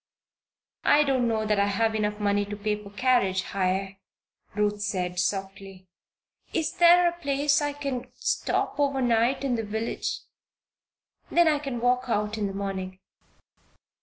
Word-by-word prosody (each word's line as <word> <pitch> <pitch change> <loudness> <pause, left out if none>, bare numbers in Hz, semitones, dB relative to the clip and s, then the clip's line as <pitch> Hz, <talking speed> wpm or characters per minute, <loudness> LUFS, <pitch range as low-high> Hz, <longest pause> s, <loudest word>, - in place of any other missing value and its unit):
"I 295 +1 +5
don't 260 -4 +1
know 220 -1 0
that 210 -1 +1
I 200 - +3
have 220 +2 +1
enough 210 -1 -1
to 205 0 0
pay 210 +1 -1
for 200 - -11
carriage 200 -4 +1
hire," 195 0 -2 0.6
Ruth 210 0 0
said, 180 -3 -2
softly. 195 0 -3 0.7
"Is 320 -2 0
is 370 - -18
there 345 0 +7
any 345 - -18
place 285 +1 +2
I 290 0 -1
can 275 -4 -5
stop - - -1
over 275 -2 +1
night 240 +2 +2
in 255 -3 0
the 225 - -2
village? 220 +2 -3 1.1
Then 345 -1 +4
I 300 -2 +3
can 270 -5 -5
walk 250 +1 +2
out 210 -2 -1
in 205 - 0
the 195 - -5
morning." 190 -1 -4
220 Hz, 155 wpm, -26 LUFS, 200-275 Hz, 1.1 s, there